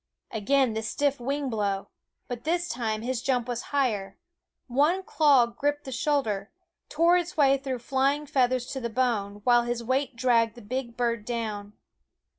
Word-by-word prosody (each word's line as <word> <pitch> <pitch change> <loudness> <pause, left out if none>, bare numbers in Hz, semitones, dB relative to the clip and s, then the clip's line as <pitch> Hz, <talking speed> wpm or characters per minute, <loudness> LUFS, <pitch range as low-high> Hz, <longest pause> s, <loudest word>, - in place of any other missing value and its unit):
Again 250 +3 +2
the 220 - -2
stiff 280 +5 0
wing 275 +3 -2
blow; 205 -4 -2 0.4
but 240 -1 -6
this 345 +2 0
time 225 -6 -2
his 250 -1 -2
jump 250 -3 0
was 240 -1 -3
higher; 215 -9 -1 0.5
one 295 +9 +2
claw 285 -8 +4
gripped 290 +5 -2
the 265 - -7
shoulder, 250 -7 0 0.4
tore 335 +3 +4
its 350 -1 -3
way 275 -2 +5
through 265 -2 -3
flying 275 +4 0
feathers 255 -3 +1
to 265 - -3
the 235 -2 -3
bone, 215 -4 -1
while 240 0 +5
his 240 0 -3
weight 260 +2 0
dragged 230 -2 +2
the 240 - -11
big 235 +1 -4
bird 235 -3 0
down. 215 -3 -4
245 Hz, 165 wpm, -27 LUFS, 230-280 Hz, 0.5 s, way